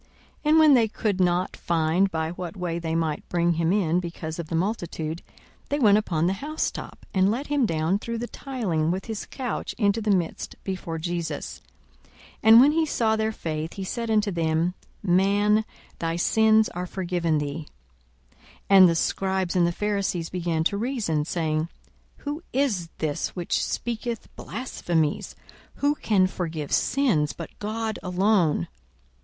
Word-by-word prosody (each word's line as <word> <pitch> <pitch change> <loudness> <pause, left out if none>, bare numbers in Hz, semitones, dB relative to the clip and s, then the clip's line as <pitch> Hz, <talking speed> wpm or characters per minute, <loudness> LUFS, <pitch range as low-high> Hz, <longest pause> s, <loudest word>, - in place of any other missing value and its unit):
42:005:019 - - -33 0.4
And 315 +1 +6
when 310 -2 +7
they 235 -4 +5
could 210 -2 -2
not 180 0 +1
find 170 +3 +1
by 160 -2 -2
what 175 +1 -6
way 175 -2 -2
they 165 -1 -2
might 160 -2 -2
bring 170 0 +2
him 165 +1 +1
in 180 -4 +2
because 170 -2 -6
of 170 - -4
the 165 - -3
multitude, 170 -4 -2 0.5
they 285 - 0
went 210 -6 +5
upon 170 -6 -1
the 185 - +2
housetop, 310 +2 -4
and 190 0 +3
let 245 +7 -1
him 285 -5 +1
down 165 +4 0
through 230 +2 -4
the 235 - -3
tiling 210 - -2
with 185 +3 -2
his 220 -3 -5
couch 255 -3 -4
into 205 0 +2
the 215 - -2
midst 180 -5 0
before 185 -4 -4
Jesus. 165 -2 -4 0.4
42:005:020 - - -28 0.3
And 225 +1 +8
when 275 +4 +7
he 320 +1 +2
saw 225 -6 +1
their 220 0 0
faith, 160 -5 -4
he 195 - -5
said 230 +4 -3
unto 210 -2 +2
him, 165 +1 +1 0.3
Man, 205 +3 +3 0.3
thy 165 0 -1
sins 220 +4 +4
are 180 +1 -5
forgiven 175 -4 -1
thee. 150 +1 -4 0.6
42:005:021 - - -30 0.3
And 190 -2 +9
the 165 - +1
scribes 190 +1 0
and 175 -2 +4
the - - +1
Pharisees 195 -3 -1
began 170 -3 -1
to 200 +4 +1
reason, 210 - -1
saying, 160 -1 -1 0.5
Who 295 +2 -5
is 230 -11 0
this 150 -2 -2
which 175 -2 -1
speaketh 235 -1 -4
blasphemies? 175 - -2 0.4
Who 285 +1 +2
can 205 -9 +2
forgive 165 -5 -4
sins, 215 - +2
but 165 - -8
God 220 +1 -3
alone? 180 - +2
185 Hz, 165 wpm, -25 LUFS, 165-220 Hz, 0.6 s, And